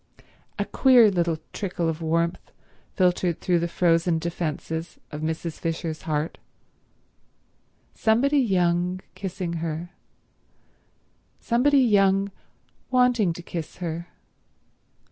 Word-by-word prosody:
A - - -1
queer 245 -5 +5
little 170 -3 0 0.2
trickle 180 -4 -2
of 165 0 -2
warmth 165 +1 -1 0.4
filtered 180 -2 +1
through 175 -2 +1
the 170 - -1
frozen 170 -1 +2
defences 160 0 -4
of 150 -1 -6
Mrs. 160 +1 -3
Fisher's 165 -1 -3
heart. 150 +1 -2 1.5
Somebody 265 +6 +2
young 180 -5 +1
kissing 185 -3 -4
her—somebody 205 - -4
young 195 -4 +3 0.6
wanting 250 -7 +3
to 175 - -9
kiss 165 -2 -6
her. 170 -1 -5
175 Hz, 95 wpm, -25 LUFS, 165-200 Hz, 1.5 s, queer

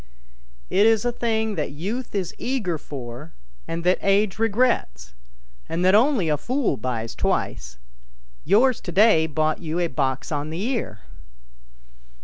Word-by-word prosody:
" - - -32 0.3
It 205 +3 +5
is 225 0 +3
a 245 - +2
thing 220 -2 -1
that - - -2
youth 210 - -5
is 185 -3 -2
eager 210 - -2
for, 135 +2 -8 0.3
and 165 +1 -4
that 180 +1 +3
age 200 +1 +2
regrets, 210 - 0 0.6
and 175 +2 -1
that 185 - +5
only 230 - +4
a 150 -1 +1
fool 255 - 0
buys 115 -3 -4
twice; 60 0 -2 0.7
yours 235 +7 +3
to 175 - -6
day 190 -5 +5
bought 155 0 0
you 160 -1 -4
a 175 - +1
box 135 -5 -2
on 145 0 -2
the 165 +5 -4
ear." 220 - -3
180 Hz, 150 wpm, -23 LUFS, 150-220 Hz, 0.7 s, It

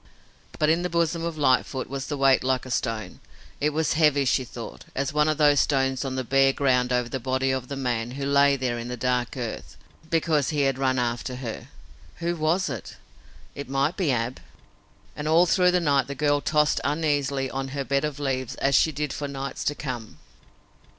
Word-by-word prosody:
But 150 - +2
in 165 +2 +3
the 180 - -2
bosom 170 0 0
of 165 -1 -3
Lightfoot 130 -2 +1
was 135 0 -5
a 145 - -2
weight 135 -1 +4
like 130 0 0
a 130 - -8
stone. 115 -3 -3 0.4
It 150 - +2
was 155 +1 0
as - - +2
heavy, 145 -3 +4
she 130 - +2
thought, 120 -1 -9
as 135 0 -1
one 150 0 +3
of 155 - 0
the 145 -1 +5
stones 135 -2 +1
on 135 -1 -3
the 130 - -2
bare 135 +2 +3
ground 125 -3 +1
over 125 -1 +1
the 130 +2 -4
body 130 +2 0
of 130 -2 -2
the 140 - -5
man 120 -4 -2
who 140 - -3
lay 140 0 +4
there 125 -3 -2
in 115 - -6
the 125 0 -5
dark 125 +1 -1
earth, 120 -3 -6 0.3
because 160 -4 +1
he 150 -2 0
had 135 -1 +1
run 130 -1 +1
after 120 +1 -2
her. 125 -3 -6 0.5
Who 170 0 -2
was 165 +4 +1
it? 120 - -6 0.6
It 140 -2 -7
might 135 +5 +1
be 175 -7 +1
Ab! 120 +1 -2 0.8
And 150 - -4
all 165 +3 +5
through 180 +1 +3
the 180 0 +3
night 140 -6 +2
the 140 - -5
girl 145 0 +1
tossed 150 +1 +2
uneasily 140 -3 0
on 135 0 -3
her 140 +1 -3
bed 140 +1 0
of 150 -1 -3
leaves, 130 -3 -2
as 140 - 0
she 160 - +4
did 150 -1 -3
for 145 - -4
nights 135 -1 -5
to 145 - 0
come. 125 -7 -6
135 Hz, 210 wpm, -25 LUFS, 130-150 Hz, 0.8 s, the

